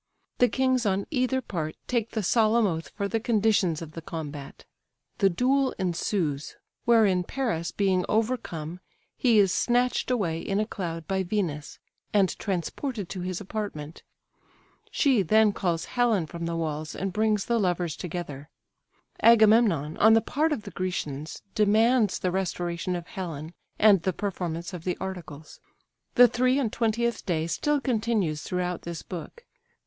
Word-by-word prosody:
The 245 Hz, -, +5 dB
kings 260 Hz, -2 st, +1 dB
on 195 Hz, 0 st, 0 dB
either 260 Hz, -2 st, +1 dB
part 155 Hz, -7 st, -4 dB
take 235 Hz, -3 st, -1 dB
the 220 Hz, -, -3 dB
solemn 225 Hz, +3 st, +3 dB
oath 165 Hz, -4 st, -2 dB
for 200 Hz, -1 st, -3 dB
the 225 Hz, +3 st, -1 dB
conditions 210 Hz, -8 st, +1 dB
of 160 Hz, -, -9 dB
the 165 Hz, -, -8 dB
combat. 155 Hz, -5 st, -7 dB, 0.5 s
The 195 Hz, -, +5 dB
duel 260 Hz, +7 st, +1 dB
ensues; 170 Hz, -4 st, -2 dB, 0.3 s
wherein 215 Hz, -6 st, +4 dB
Paris 180 Hz, -8 st, -2 dB
being 190 Hz, -2 st, +1 dB
overcome, 210 Hz, -8 st, -2 dB, 0.4 s
he 240 Hz, -4 st, +3 dB
is 195 Hz, -3 st, +4 dB
snatched 245 Hz, +1 st, +1 dB
away 190 Hz, -10 st, 0 dB
in 195 Hz, +3 st, -1 dB
a 215 Hz, -, +1 dB
cloud 165 Hz, -6 st, -5 dB
by 190 Hz, -1 st, 0 dB
Venus, 175 Hz, -6 st, -3 dB, 0.4 s
and 195 Hz, -3 st, +4 dB
transported 200 Hz, -, -3 dB
to 185 Hz, -, -5 dB
his 180 Hz, 0 st, -3 dB
apartment. 190 Hz, -7 st, -6 dB, 0.9 s
She 265 Hz, -8 st, +3 dB
then 215 Hz, +3 st, +4 dB
calls 170 Hz, -5 st, -1 dB
Helen 235 Hz, -8 st, +1 dB
from 170 Hz, +1 st, -6 dB
the 170 Hz, -, -2 dB
walls, 155 Hz, -1 st, -3 dB
and 195 Hz, -1 st, -3 dB
brings 215 Hz, -1 st, +1 dB
the 235 Hz, -1 st, +1 dB
lovers 175 Hz, -4 st, 0 dB
together. 160 Hz, -5 st, -6 dB, 0.7 s
Agamemnon, 215 Hz, -9 st, +5 dB
on 220 Hz, +1 st, +6 dB
the -, -, +6 dB
part 310 Hz, +7 st, 0 dB
of 245 Hz, -8 st, -2 dB
the -, -, -8 dB
Grecians, 155 Hz, -5 st, -4 dB
demands 220 Hz, +1 st, +3 dB
the 185 Hz, -, -1 dB
restoration 180 Hz, -1 st, -2 dB
of 175 Hz, -1 st, -5 dB
Helen, 165 Hz, -4 st, -6 dB, 0.2 s
and 205 Hz, -4 st, +6 dB
the 185 Hz, +2 st, -1 dB
performance 175 Hz, -2 st, -4 dB
of 175 Hz, -3 st, -7 dB
the 180 Hz, 0 st, -2 dB
articles. 170 Hz, -6 st, -7 dB, 0.6 s
The 245 Hz, -1 st, +9 dB
three 255 Hz, +3 st, +2 dB
and 250 Hz, -6 st, -1 dB
twentieth 235 Hz, +1 st, 0 dB
day 160 Hz, -3 st, -1 dB
still 295 Hz, -, 0 dB
continues 220 Hz, -, 0 dB
throughout 180 Hz, -1 st, -2 dB
this 170 Hz, -1 st, -6 dB
book. 195 Hz, -, -8 dB
195 Hz, 155 wpm, -27 LUFS, 170-225 Hz, 0.9 s, The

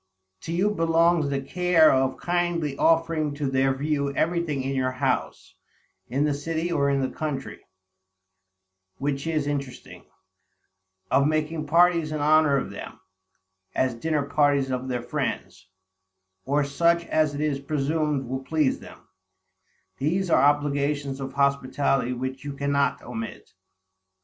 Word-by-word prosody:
To 165 Hz, -, -7 dB
you 190 Hz, +5 st, +1 dB
belongs 165 Hz, -3 st, +2 dB
the 140 Hz, -1 st, -1 dB
care 175 Hz, +2 st, +4 dB
of 130 Hz, 0 st, +1 dB
kindly 175 Hz, -3 st, -1 dB
offering 165 Hz, -2 st, +1 dB
to 145 Hz, 0 st, -3 dB
their 135 Hz, 0 st, +2 dB
view 140 Hz, +1 st, -1 dB
everything 165 Hz, -5 st, 0 dB
in 135 Hz, +1 st, -2 dB
your 130 Hz, -1 st, 0 dB
house, 130 Hz, 0 st, -2 dB, 0.5 s
in 135 Hz, +4 st, 0 dB
the 150 Hz, -1 st, +1 dB
city 160 Hz, +4 st, -3 dB
or 140 Hz, -3 st, +2 dB
in 140 Hz, -1 st, +1 dB
the 130 Hz, -, -1 dB
country, 145 Hz, -4 st, -4 dB, 1.4 s
which 140 Hz, +1 st, -2 dB
is 155 Hz, -3 st, 0 dB
interesting; 140 Hz, -3 st, -5 dB, 1.1 s
of 140 Hz, +1 st, +4 dB
making 155 Hz, 0 st, -1 dB
parties 170 Hz, 0 st, +3 dB
in 155 Hz, -, -2 dB
honor 150 Hz, -1 st, +4 dB
of 125 Hz, -, -3 dB
them, 100 Hz, -, -9 dB, 0.8 s
as 130 Hz, -2 st, +1 dB
dinner 150 Hz, +5 st, -1 dB
parties 140 Hz, -1 st, +2 dB
of 130 Hz, 0 st, -3 dB
their 125 Hz, -2 st, -3 dB
friends, 95 Hz, -4 st, -4 dB, 0.8 s
or 145 Hz, +2 st, +1 dB
such 170 Hz, +4 st, +1 dB
as 155 Hz, -2 st, +1 dB
it 145 Hz, -, -3 dB
is 150 Hz, -2 st, 0 dB
presumed 150 Hz, 0 st, -1 dB
will 130 Hz, +2 st, -3 dB
please 155 Hz, -1 st, +1 dB
them; -, -, -14 dB, 0.9 s
these 175 Hz, +6 st, 0 dB
are -, -, +5 dB
obligations 145 Hz, -1 st, +1 dB
of 135 Hz, -1 st, -6 dB
hospitality 140 Hz, -2 st, +1 dB
which 130 Hz, +2 st, -4 dB
you 145 Hz, -1 st, -5 dB
cannot 140 Hz, -2 st, 0 dB
omit. 115 Hz, -1 st, -7 dB
145 Hz, 140 wpm, -25 LUFS, 135-155 Hz, 1.4 s, are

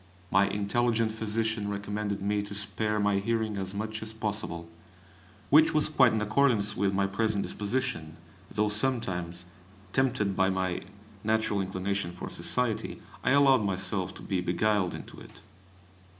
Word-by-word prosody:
My 95 Hz, +1 st, +5 dB
intelligent 110 Hz, +3 st, +1 dB
physician 110 Hz, -1 st, -1 dB
recommended 100 Hz, 0 st, -3 dB
me 105 Hz, +1 st, +1 dB
to 100 Hz, 0 st, -7 dB
spare 105 Hz, +1 st, -1 dB
my 100 Hz, -1 st, +2 dB
hearing 110 Hz, -1 st, -1 dB
as 95 Hz, +1 st, -4 dB
much 110 Hz, +1 st, -4 dB
as 110 Hz, 0 st, -5 dB
possible, 105 Hz, -6 st, -3 dB, 0.8 s
which 155 Hz, +2 st, +6 dB
was 155 Hz, -, +3 dB
quite 135 Hz, -5 st, +5 dB
in 110 Hz, -, 0 dB
accordance 110 Hz, -2 st, +3 dB
with 100 Hz, 0 st, +1 dB
my 100 Hz, 0 st, +1 dB
present 100 Hz, +1 st, 0 dB
disposition, 105 Hz, -7 st, -2 dB, 0.3 s
though 105 Hz, +1 st, +1 dB
sometimes, 95 Hz, -7 st, -1 dB, 0.5 s
tempted 125 Hz, -7 st, +1 dB
by 95 Hz, -1 st, +3 dB
my 95 Hz, -2 st, -1 dB, 0.4 s
natural 110 Hz, -2 st, +1 dB
inclination 95 Hz, -1 st, -2 dB
for 90 Hz, -, -7 dB
society, 125 Hz, -4 st, -1 dB, 0.2 s
I -, -, +2 dB
allowed 135 Hz, -4 st, +5 dB
myself 95 Hz, -1 st, -1 dB
to -, -, -10 dB
be 95 Hz, -3 st, -1 dB
beguiled 105 Hz, -1 st, +1 dB
into -, -, -10 dB
it. -, -, -14 dB
105 Hz, 145 wpm, -29 LUFS, 95-110 Hz, 0.8 s, which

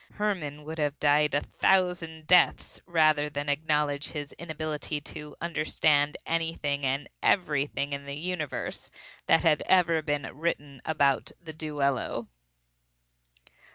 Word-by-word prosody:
Hermann 170 Hz, -9 st, -2 dB
would 160 Hz, +2 st, -7 dB
have 145 Hz, -1 st, -1 dB
died 150 Hz, 0 st, +3 dB
a 145 Hz, -, +2 dB
thousand 175 Hz, -4 st, +1 dB
deaths 180 Hz, +2 st, +3 dB
rather 155 Hz, -3 st, +3 dB
than 145 Hz, 0 st, -3 dB
acknowledge 150 Hz, -1 st, 0 dB
his 145 Hz, -2 st, -5 dB
inability 155 Hz, -2 st, -4 dB
to 150 Hz, +1 st, -9 dB
understand 155 Hz, -3 st, +1 dB
anything 160 Hz, -4 st, -1 dB
and 135 Hz, +2 st, 0 dB
everything 145 Hz, -4 st, +1 dB
in 140 Hz, 0 st, -5 dB
the 140 Hz, 0 st, -5 dB
universe 165 Hz, -2 st, -4 dB, 0.4 s
that 165 Hz, -, +4 dB
had 155 Hz, -3 st, +4 dB
ever 170 Hz, -3 st, +4 dB
been 145 Hz, -2 st, -2 dB
written 145 Hz, -3 st, -3 dB
about 140 Hz, -4 st, +1 dB
the 165 Hz, -2 st, -9 dB
duello. 145 Hz, -4 st, -2 dB
150 Hz, 120 wpm, -28 LUFS, 145-165 Hz, 0.4 s, that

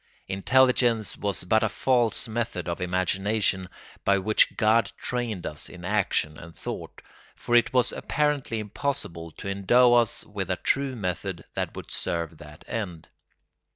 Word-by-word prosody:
Intelligence 120 Hz, +1 st, +3 dB
was 100 Hz, -3 st, -3 dB
but 110 Hz, +5 st, +3 dB
a 110 Hz, -, +2 dB
false 120 Hz, -3 st, +2 dB
method 110 Hz, -6 st, -3 dB
of 85 Hz, +1 st, -3 dB
imagination 95 Hz, +1 st, 0 dB, 0.3 s
by 100 Hz, 0 st, +4 dB
which 105 Hz, +3 st, +3 dB
God 110 Hz, +1 st, +3 dB
trained 115 Hz, -7 st, -3 dB
us 75 Hz, -, -3 dB
in 90 Hz, -1 st, -10 dB
action 95 Hz, -7 st, 0 dB
and 85 Hz, 0 st, -12 dB
thought; -, -, -7 dB, 0.3 s
for 120 Hz, -, -4 dB
it 120 Hz, -, +5 dB
was 125 Hz, -1 st, +3 dB
apparently 150 Hz, -5 st, -1 dB
impossible 105 Hz, -6 st, -3 dB
to -, -, -8 dB
endow 120 Hz, +6 st, +4 dB
us 120 Hz, -3 st, +2 dB
with 100 Hz, -3 st, -5 dB
a 95 Hz, -, +2 dB
true 135 Hz, +6 st, 0 dB
method 95 Hz, -3 st, -3 dB
that -, -, -3 dB
would -, -, -8 dB
serve 85 Hz, -2 st, -2 dB
that 75 Hz, 0 st, -13 dB
end. 100 Hz, -9 st, -5 dB
105 Hz, 150 wpm, -26 LUFS, 90-120 Hz, 0.3 s, it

